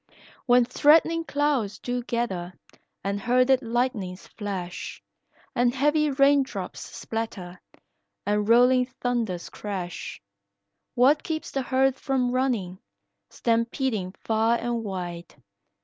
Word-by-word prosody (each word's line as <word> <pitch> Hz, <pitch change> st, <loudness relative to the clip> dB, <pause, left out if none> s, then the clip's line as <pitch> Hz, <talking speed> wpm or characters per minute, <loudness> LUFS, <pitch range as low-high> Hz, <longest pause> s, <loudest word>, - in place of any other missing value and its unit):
"When 245 Hz, 0 st, +6 dB
threatening 325 Hz, +6 st, +4 dB
clouds 285 Hz, -9 st, 0 dB
do 245 Hz, 0 st, -3 dB
gather 195 Hz, -8 st, -2 dB, 0.5 s
and 200 Hz, +1 st, -1 dB
herded 255 Hz, +3 st, +3 dB
lightnings 230 Hz, -6 st, -2 dB
flash, 190 Hz, -4 st, -6 dB, 0.5 s
And 245 Hz, +1 st, +2 dB
heavy 295 Hz, +2 st, +2 dB
rain 275 Hz, +1 st, +4 dB
drops 265 Hz, -, -5 dB
splatter, 195 Hz, -6 st, -6 dB, 0.6 s
and 210 Hz, +1 st, 0 dB
rolling 250 Hz, +2 st, +5 dB
thunders 240 Hz, -8 st, -3 dB
crash; 185 Hz, -5 st, -5 dB, 0.8 s
What 265 Hz, +5 st, +5 dB
keeps 320 Hz, 0 st, -4 dB
the 270 Hz, -, -1 dB
herd 265 Hz, +1 st, +2 dB
from 260 Hz, -3 st, 0 dB
running, 235 Hz, -8 st, -1 dB, 0.5 s
stampeding 230 Hz, -4 st, -1 dB
far 225 Hz, +1 st, +2 dB
and 235 Hz, -1 st, -2 dB
wide? 175 Hz, -4 st, -6 dB
240 Hz, 105 wpm, -26 LUFS, 205-265 Hz, 0.8 s, When